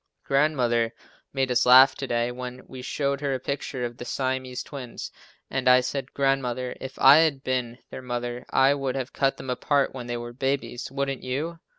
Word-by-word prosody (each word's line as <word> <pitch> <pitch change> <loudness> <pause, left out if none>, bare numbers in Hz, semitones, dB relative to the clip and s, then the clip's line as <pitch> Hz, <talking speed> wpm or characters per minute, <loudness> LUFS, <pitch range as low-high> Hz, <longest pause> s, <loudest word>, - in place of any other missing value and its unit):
Grandmother 125 -5 +1 0.4
made 135 -2 0
us 125 - +3
laugh 130 +2 +8
to 135 - -6
day 120 0 0
when 125 +1 -7
we 130 - -9
showed 140 +2 -2
her 140 -2 0
a - - -3
picture 130 -1 -3
of 120 0 -6
the - - -7
Siamese 130 0 -3
twins, 130 -5 -8 0.4
and 130 -1 -2
I 125 0 +7
said, 135 +1 -4
"Grandmother, 130 -2 0
if 130 0 -7
I 135 +2 +8
had 155 -4 +2
been 125 -2 -2
their - - -7
mother 120 -1 -4
I 135 +1 +4
should 135 -2 -2
have 130 -1 -4
cut 135 -1 +1
them 130 - -5
apart 140 +2 +1
when 125 -2 -7
they 120 0 -3
were 120 0 -7
babies, 130 -2 -2
wouldn't 135 -1 -2
you?" 150 +7 -3
130 Hz, 195 wpm, -25 LUFS, 125-135 Hz, 0.4 s, laugh